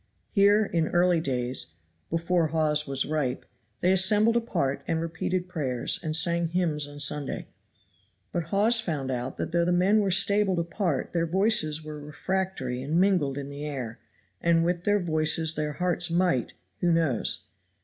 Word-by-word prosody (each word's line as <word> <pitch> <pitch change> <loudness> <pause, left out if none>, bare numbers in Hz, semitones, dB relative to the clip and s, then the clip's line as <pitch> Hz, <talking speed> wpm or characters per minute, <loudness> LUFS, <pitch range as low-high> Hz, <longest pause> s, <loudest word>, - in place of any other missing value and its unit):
Here, 205 +1 +4
in 165 -4 0
early 175 -1 +2
days, 125 - -1 0.4
before 165 0 +1
Hawes 150 -1 +1
was 135 -1 -1
ripe, 150 -5 -2 0.4
they 180 - +3
assembled 210 +4 +3
apart 140 - -1
and 165 - 0
repeated 165 +2 -3
prayers, 135 -9 0
and 155 -1 -3
sang 170 +1 +2
hymns 160 -4 -1
on 145 0 -11
Sunday. 145 -1 -1 0.8
But 170 -2 -2
Hawes 210 +7 +3
found 150 -10 -3
out 125 0 -4
that - - -4
though 170 0 +2
the 175 - +1
men 185 +5 +3
were 200 -2 +1
stabled 195 0 +3
apart 170 -2 -2
their 170 -1 0
voices 160 -4 +2
were 150 -1 -7
refractory 150 -4 -3
and 150 +6 0
mingled 180 -8 +2
in 140 0 -6
the 140 +1 -7
air, 130 -6 -5 0.4
and 165 -1 +3
with 175 0 -1
their 205 0 +3
voices 160 -2 +1
their 150 -1 -3
hearts 175 +1 +1
might, 170 -8 +1 0.3
who 175 - +2
knows? 160 -8 0
165 Hz, 160 wpm, -27 LUFS, 150-180 Hz, 0.8 s, Here